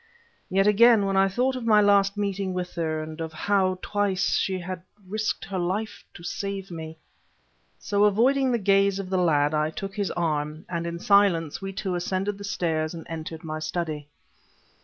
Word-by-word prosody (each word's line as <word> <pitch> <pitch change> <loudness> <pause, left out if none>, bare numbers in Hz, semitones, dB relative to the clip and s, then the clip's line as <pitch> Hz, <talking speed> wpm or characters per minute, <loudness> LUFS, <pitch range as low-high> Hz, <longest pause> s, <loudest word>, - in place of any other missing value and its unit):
Yet, 195 +1 +3
again, 215 0 +6
when 195 0 0
I 195 0 +5
thought 250 +7 0
of 245 -2 -4
my 215 -2 +6
last 200 0 +4
meeting 200 -2 -2
with 180 -1 -4
her, 160 -2 -2
and 155 +1 -8
of 160 -1 -4
how, 185 +2 +1
twice, 195 -2 0
she 190 -1 -1
had 180 0 -6 0.3
risked 215 +3 -2
her 190 -1 -3
life 195 +5 -3
to 170 - -11
save 195 +1 -4
me... 160 -1 -7 0.8
So, 205 0 +1
avoiding 255 +6 +3
the 240 - +2
gaze 195 -1 +3
of 195 -1 -5
the 185 - +2
lad, 150 -4 +2
I 155 0 +1
took 195 +4 -6
his 205 -3 -1
arm, 155 -2 -2
and 170 -1 -3
in 170 0 -4
silence 180 -5 +3
we 195 0 -4
two 190 -1 -3
ascended 190 +3 -2
the - - -7
stairs 165 -4 -1
and 165 - -8
entered 160 0 -6
my 155 -1 -4
study... 155 -2 -3
190 Hz, 185 wpm, -25 LUFS, 165-200 Hz, 0.8 s, again